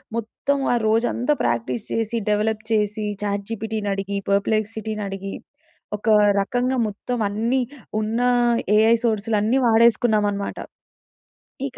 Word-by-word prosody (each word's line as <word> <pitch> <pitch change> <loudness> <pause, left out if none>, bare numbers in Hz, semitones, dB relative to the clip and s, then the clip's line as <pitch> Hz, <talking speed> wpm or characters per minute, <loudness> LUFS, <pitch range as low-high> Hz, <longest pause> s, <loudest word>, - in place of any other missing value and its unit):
మొత్తం 230 +5 -2 0.2
ఆ - - +3
రోజంతా 240 +5 +1
ప్రాక్టీస్ 120 +1 -1
చేసి 225 +1 -1
డెవలప్ 215 +1 +1
చేసి 215 0 0 0.2
చాట్‌జీపిటీని 210 +1 -3
అడిగి 200 0 -3
పర్ప్లెక్సిటీని 215 +1 -1
అడిగి 195 0 -6 0.6
ఒక 210 - -10 0.3
రకంగా 245 +5 -1
మొత్తం 240 +4 -4
అన్నీ 230 +6 0 0.4
ఉన్న 220 +3 -1 0.6
ఏఐ 225 +2 +5
సోర్స్‌లన్నీ 220 +2 +1
వాడేసుకున్నామనమాట. 220 -3 +2 1.1
ఇక 260 - -12
215 Hz, 100 wpm, -22 LUFS, 205-230 Hz, 1.1 s, ఏఐ